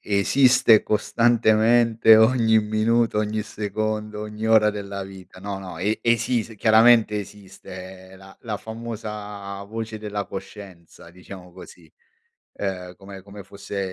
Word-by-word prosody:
Esiste 115 +2 +3
costantemente 115 0 +3
ogni 110 -1 +4
minuto, 110 +1 0
ogni 105 0 -2
secondo, 105 0 -4
ogni 105 +1 -6
ora 110 -1 +4
della 100 -1 -6
vita. 95 -1 -13
No 100 0 -5
no, 95 -3 -9
e 105 +4 -1
esis 115 -1 0
chiaramente 110 0 +4
esiste 95 -2 -11
la 95 0 -16
la 110 -3 -4
famosa 105 -3 -8
voce 110 +1 -6
della 105 -1 -5
coscienza, 95 -4 -11
diciamo 90 0 -13
così. 85 -3 -15 0.6
Uhm, 90 -2 -6
come 95 -1 -12
come 100 0 -12
fosse 100 +1 -8
105 Hz, 120 wpm, -22 LUFS, 95-110 Hz, 0.6 s, ogni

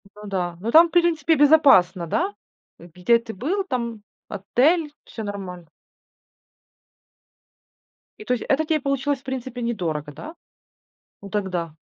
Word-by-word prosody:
Ну 210 0 -11
да, 180 -3 -3
ну, 225 +3 -3
там, 330 +4 +7
в - - -21
принципе, 330 -2 +2
безопасно, 275 - +4
да? 370 - -1 0.5
Э, - - -13
где 210 +6 +2
ты 230 -1 -9
был? 325 - -2
Там 235 - -4 0.3
отель, 290 - +1
всё 225 - -8
нормально. 185 -5 -7 2.5
И 215 - -10
то 250 - 0
есть 245 - -3
это 295 +3 +2
тебе 310 -1 0
получилось, 275 0 -1
в - - -34
принципе, 260 -2 -6
недорого, 165 -11 -3
да? 305 - -10 0.9
Ну 200 - -10
тогда. 180 -6 -3
235 Hz, 140 wpm, -22 LUFS, 190-295 Hz, 2.5 s, там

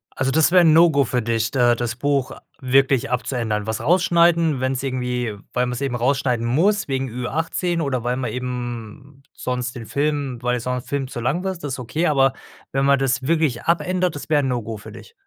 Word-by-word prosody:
Also 135 0 0
das 160 +2 +3
wäre 180 -1 +6
'n 160 -2 +6
No-Go 160 -5 +5
für 125 +1 -1
dich, 115 -1 0
da 120 -2 +3
das 120 0 -3
Buch 140 -1 0 0.3
wirklich 135 -1 +2
abzuändern. 115 -4 -2
Was 110 0 -3
rausschneiden, 170 -3 +3
wenn's 130 0 -1
irgendwie 125 -4 -2 0.2
weil 125 0 +1
man's 125 +1 -4
eben 135 -3 -1
rausschneiden 125 -1 0
muss 190 - +2
wegen 135 -1 -2
Ü-18 160 +8 -2
oder 130 -5 -1
weil 125 +1 0
man 130 -2 -3
eben 125 +2 -6
sonst 125 0 -3
den 115 -2 -7
Film 145 -3 -1
weil 125 0 0
sonst 125 +1 -4
Film 140 -2 -2
zu 125 -2 -6
lang 150 +10 -1
wird, 190 -2 -2
das 145 -3 -3
ist 130 - -5
okay, 150 +8 -2
aber 135 -3 +3 0.4
wenn 135 +1 +1
man 140 -1 +4
das 130 -1 0
wirklich 155 -5 +1
abändert, 180 +1 0
das 145 - -8
wäre 150 -2 +3
'n - - 0
No-Go 115 -3 -3
für 105 - -11
dich? 465 - -13
130 Hz, 200 wpm, -21 LUFS, 125-150 Hz, 0.4 s, wäre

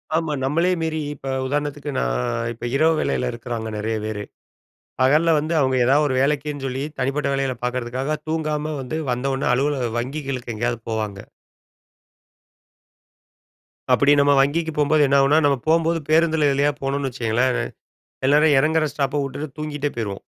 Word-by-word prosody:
ஆமா. 160 -2 0
நம்மளே 165 +7 +1
மீறி, 160 -1 -1 0.2
இப்ப 135 - -7 0.2
உதாரணத்துக்கு 145 +1 -2
நான் - - 0 0.3
இப்ப, 120 - -8
இரவு 160 +3 +4
வேலையில 125 - 0
இருக்கிறாங்க 115 -1 -5
நெறைய 110 +1 -2
பேரு. 105 -1 -4 0.8
பகல்ல 150 +6 +4
வந்து 155 +3 -2
அவுங்க 130 -1 +2
ஏதாவது 145 +4 +4
ஒரு 130 - -1
வேலைக்குன்னு 145 0 -1
சொல்லி, 130 +2 -3 0.2
தனிப்பட்ட 140 +2 0
வேலைகள 135 -2 -1
பாக்கறதுக்காக, 125 +4 -2
தூங்காம 155 -1 -2
வந்து, 155 +5 -4
வந்தோன 135 +1 -1
அலுவலக 135 -1 0
வங்கிகளுக்கு 130 -2 -4
எங்கேயாவது 120 +1 -1
போவாங்க. 110 -3 -3 2.7
அப்டி 140 +1 +5
நம்ம 145 0 +4
வங்கிக்கு 160 +4 +1
போம்போது 150 +1 +3
என்னாகுனா, 140 +2 +4
நம்ம 140 -2 +3
போம்போது 165 +1 +2
பேருந்தில 160 -2 +3
எதுலயாவது 140 +1 +1
போனோனு 135 0 -1
வச்சுக்கோங்களேன், 125 +1 0 0.7
எல்லாரும் 150 +1 +5
எறங்குற 155 +1 +2
ஸ்டாப்பை 145 0 -1
விட்டுட்டு, 140 +1 -6
தூங்கிகிட்டே 150 -1 -3
போயிருவோம். 100 -4 -4
140 Hz, 135 wpm, -22 LUFS, 125-150 Hz, 2.7 s, அப்டி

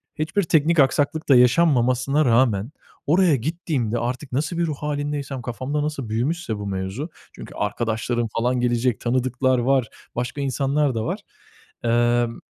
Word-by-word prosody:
hiçbir 160 +6 0
teknik 160 0 +2
aksaklık 145 +3 +2
da 135 - +7
yaşanmamasına 130 +1 +3
rağmen 115 -1 +2 0.4
oraya 170 -1 +4
gittiğimde, 130 - -2
artık 125 +3 -4
nasıl 155 +6 -1
bir 170 - +1
ruh 155 - -2
hâlindeysem, 145 -2 -3
kafamda 130 +5 -3
nasıl 145 -7 -4
büyümüşse 120 +1 -1
bu 100 0 -5
mevzu, 95 - -4 0.3
çünkü - - -10
arkadaşlarım 115 +1 -1
falan 125 +2 +1
gelecek, 120 -2 +1
tanıdıklar 130 +1 +1
var, 130 -1 +2 0.3
başka 125 +4 -3
insanlar 140 0 0
da 110 - -2
var. - - -2 0.6
Emm, 120 0 +1
130 Hz, 140 wpm, -23 LUFS, 120-150 Hz, 0.6 s, da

